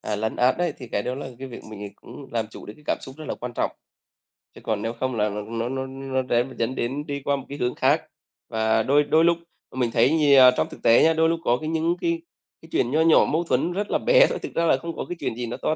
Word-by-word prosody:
à, 105 - -3
lấn 110 +1 -2
át 125 +4 +3
đấy 175 0 0
thì 125 - -9
cái 100 - 0
đó 125 - -3
là 140 - -6
cái 135 0 -7
việc 120 - -9
mình 105 -1 -7
cũng 140 - -12
làm 115 -2 -1
chủ - - -11
được 105 - -7
cái 150 - -20
cảm - - 0
xúc 135 - -10
rất 155 - -8
là - - -2
quan 125 0 -7
trọng. - - 0 0.9
Chứ - - -12
còn 105 -2 -1
nếu 115 +1 -2
không 130 -1 -1
là 105 -1 +1
l - - -6
nó 115 +1 -3
nó 130 0 -3
nó 135 0 -3
rẽ 120 -2 +1
dẫn 115 +3 -1
đến 140 +5 -3
đi 140 0 -4
qua 140 - +2
một 135 - -7
cái 140 - -6
hướng 125 -2 -1
khác. - - +3 0.5
Và 110 0 +1
đôi 145 +4 +4
đôi 160 +3 +3
lúc 170 0 +4 0.4
mình 125 -3 0
thấy 120 +5 +3
nhiều 145 -4 +6
trong - - 0
thực - - -12
tế 115 - +6
nhá, 160 - +5
đôi 160 0 +3
lúc 165 - 0
có 120 - +2
cái 155 +3 -5
những 165 +1 +1
cái 335 0 0 0.4
cái 160 - -15
chuyện 120 - +1
nho 155 - +3
nhỏ 165 0 +6
mâu 165 +3 0
thuẫn 170 +1 0
rất 205 +2 -3
là - - +3
bé - - +5
thôi, - - -3
thực - - -7
ra 170 - +1
là 145 - +4
không 165 +4 -6
có - - -4
cái 175 - -3
chuyện 115 - -3
gì 120 - -4
nó 120 - -5
to 155 - -1
130 Hz, 295 wpm, -24 LUFS, 120-160 Hz, 0.9 s, nhiều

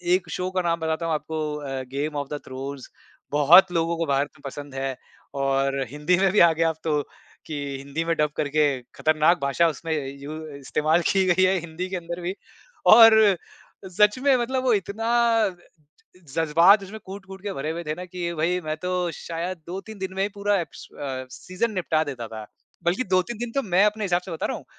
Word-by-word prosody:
एक 180 -2 -3
शो 180 +2 -2
का 185 0 0
नाम 170 -1 0
बताता 160 +1 -2
हूँ 165 - 0
आपको 155 0 -3
अ, 135 -3 -4
गेम 140 +4 -4
ऑफ़ 140 -1 -3
द 145 - -3
थ्रोन्स। 135 +1 -7 0.4
बहुत 165 +6 +7
लोगों 170 0 0
को 165 - -1
भारत 140 0 +1
में - - -21
पसंद 145 0 -7
है 135 0 -2 0.5
और 135 0 +1
हिंदी 150 +6 +1
में 190 -1 +3
भी 210 - +3
आ 170 - +7
गया 165 +1 +2
अब 160 - -3
तो 150 -2 +1 0.4
कि 155 - -6 0.2
हिंदी 140 +4 -4
में 165 0 +1
डब 150 -1 +1
करके 150 +1 +1 0.3
खतरनाक 155 +2 +3
भाषा 140 +5 +2
उसमें 160 +1 -6
य 150 -2 -1 0.2
यू 150 +2 -6 0.2
इस्तेमाल 155 +4 +1
की 195 -1 +3
गई 185 +1 +3
है 185 +1 +3
हिंदी 170 +2 -5
के 190 - -3
अंदर 170 0 -6
भी 175 +2 -2 0.6
और 225 0 +9
अ, 210 -3 +5 0.5
सच 210 +5 +3
में 275 0 +4
मतलब 255 +2 -1
वो 250 -2 +3
इतना 205 +3 -2 0.4
अ, - - +1 0.7
ज 180 - -23
जज़्बात 165 +6 +5
उसमें 195 +3 -8
कूट-कूट 190 0 -9
के 200 -1 -3
भरे 155 -2 -3
हुए 170 +2 -4
थे 155 -1 -2
ना 180 - -7
कि 180 0 -11
ये 170 0 -2
भई, 170 +3 0
मैं 155 -2 -4
तो 180 -1 -1
शायद 170 +3 -5
2-3 195 +4 -7
दिन 190 -1 -5
में 190 - -1
ही 200 - +1
पूरा 205 0 +1
एप्स 170 - -8
अ, 130 -2 -4
सीज़न 185 - -3
निपटा 165 -4 +1
देता 130 -6 -5
था। 110 -1 -7 0.4
बल्कि 180 +9 +1
2-3 185 +5 +1
दिन 240 0 -4
तो 275 - 0
मैं 190 -2 +3
अपने 210 0 0
हिसाब 175 -2 +1
से - - -8
बता 160 - -2
रहा - - -3
हूँ। - - -11
170 Hz, 220 wpm, -24 LUFS, 150-190 Hz, 0.7 s, और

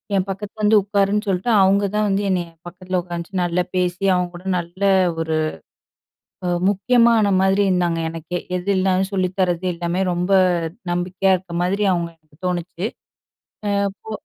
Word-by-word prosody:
"என் 190 0 +1
பக்கத்துல 205 +2 -6
வந்து 210 0 +6
உட்காருன்னு" 205 +1 0
சொல்ட்டு, 190 +5 -1
அவுங்க 195 +1 +4
தான் 210 0 +2
வந்து 195 +1 +1
என்னைய 175 -2 -1 0.2
பக்கத்துல 185 +1 -3
உட்காந்து 175 +2 -4
நல்லா 175 +1 0
பேசி, 180 +1 -1
அவங்க 180 0 0
கூட 180 - -15
நல்ல 175 +3 -9 0.4
ஒரு 160 -1 -1 1.1
அ - - +1 0.2
முக்கியமான 225 +1 +3
மாரி 190 +1 +3
இருந்தாங்க 175 -2 +1
எனக்கே. 165 +2 -5 0.2
எதுல்ன்னாலும் 190 0 +1
சொல்லித்தரது, 185 -1 0
எல்லாமே 170 +2 -2
ரொம்ப 180 +2 -2 0.6
நம்பிக்கையா 180 +2 0
இருக்க 180 -1 -12
மாதிரி 200 +3 0
அவங்கள 170 -1 -2
எனக்குத் 155 0 -28
தோணுச்சு. 180 +1 -3 0.8
அ - - +1 0.3
போ 220 - -8
185 Hz, 145 wpm, -21 LUFS, 175-200 Hz, 1.1 s, வந்து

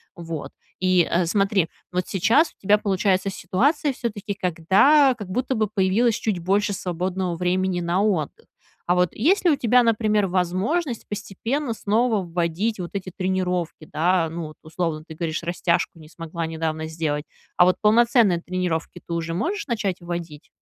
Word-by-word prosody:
Вот. 165 -3 -6 0.3
И, 185 -1 +4
э, 175 +1 +2
смотри, 195 -1 +1 0.2
вот 180 0 -1
сейчас 230 - +3
у - - -38
тебя 205 +2 +4
получается 195 -1 +1
ситуация, 270 - +1
всё-таки, 215 -5 -4
когда, 195 - +4
как 210 -5 -8
будто 255 +6 -1
бы, 215 -2 +1
появилось 210 +3 +2
чуть 215 -5 -2
больше 200 +4 +1
свободного 180 -1 -2
времени 180 +1 0
на 175 +3 0
отдых. 210 - -1 0.4
А 180 - +4
вот, 180 -1 +2
есть 370 - +2
ли 345 - +5
у 290 - +2
тебя, 245 0 +4
например, 215 -3 +2
возможность 190 - -1
постепенно 225 +6 -3
снова 220 0 +1
вводить 175 +6 -1
вот 175 -1 -5
эти 190 -2 -4
тренировки, 180 -4 -2
да? 170 +1 +2
Ну, 165 +1 -5
вот 155 - -12
условно, 160 -1 -3
ты 160 - -10
говоришь, 160 0 -3
растяжку 170 -1 -1
не 155 - -13
смогла 165 +1 -5
недавно 160 -1 -3
сделать. 155 -2 -2 0.3
А 175 - +7
вот 185 - +3
полноценные 220 -4 +4
тренировки 175 -1 -3
ты 170 - -5
уже 165 0 -2
можешь 350 - -2
начать 210 -7 -1
вводить? 170 -4 -6
185 Hz, 165 wpm, -23 LUFS, 170-215 Hz, 0.4 s, А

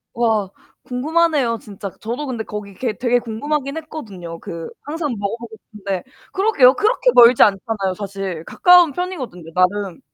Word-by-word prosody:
와 220 -5 +1 0.3
궁금하네요, 285 -2 +1
진짜. 200 -1 -7
저도 245 +6 -4
근데 235 -4 -3
거기 210 -2 -7
개 230 +2 -2
되게 245 -1 +2
궁금하긴 275 +6 -3
했거든요. 200 - -8
그 165 -1 -7
항상 295 -3 -3
먹어보고 220 +3 -5 0.2
싶은데 195 -3 -4 0.3
그러게요. 380 - +5
그렇게 485 +4 +2
멀지 240 0 +7
않잖아요, 195 -1 +2
사실. 195 -5 -5
가까운 355 -3 +5
편이거든요, 260 - -5
나름. 185 0 +1
230 Hz, 355 characters per minute, -20 LUFS, 200-295 Hz, 0.3 s, 멀지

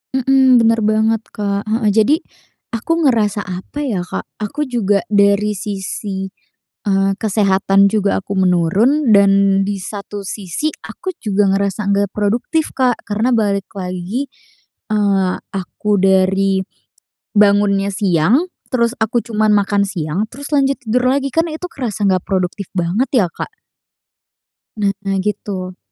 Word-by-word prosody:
Mhm, 265 -1 +4
benar 225 0 +3
banget, 220 +1 +2
Kak. 200 0 -2
Heeh, 220 -1 +1
jadi 220 +8 +4 0.6
aku 330 +9 -1
ngerasa 210 -4 +1
apa 185 +9 -7
ya, 220 -10 -1
Kak? - - -4 0.2
Aku 215 +8 -3
juga 215 -7 0
dari 200 +1 +3
sisi, 195 -1 -5 0.6
eee, 195 0 +2
kesehatan 195 -1 +2
juga 200 -1 +1
aku 200 +1 -5
menurun 195 - +3
dan 195 -1 +4
di 200 0 -2
satu 200 +1 -7
sisi 205 - -3
aku 375 -2 -6
juga 205 -1 +1
ngerasa 200 +1 -1
nggak 200 0 +1
produktif, 230 +10 -1
Kak, 255 -2 +1
karena 220 +4 0
balik 200 -5 0
lagi, 185 +8 -3 0.6
eee, 200 -3 +2 0.2
aku 195 +2 -4
dari 190 0 +3 0.8
bangunnya 200 -1 +4
siang, 200 - +2 0.2
terus 235 -1 +2
aku 220 +2 +1
cuma 215 -2 +1
makan 205 -1 +2
siang 175 0 -2
terus 285 +3 -9
lanjut 275 -1 +2
tidur 250 +2 +1
lagi 275 +1 0
kan 330 +1 +2
itu 315 +3 -5
kerasa 220 -8 -3
nggak 185 -2 +2
produktif 185 0 -2
banget 190 +10 0
ya, 235 -8 +4
Kak. - - -6 1.5
Nah 195 -1 -1
gitu. 190 -3 -4
205 Hz, 130 wpm, -17 LUFS, 195-230 Hz, 1.5 s, Mhm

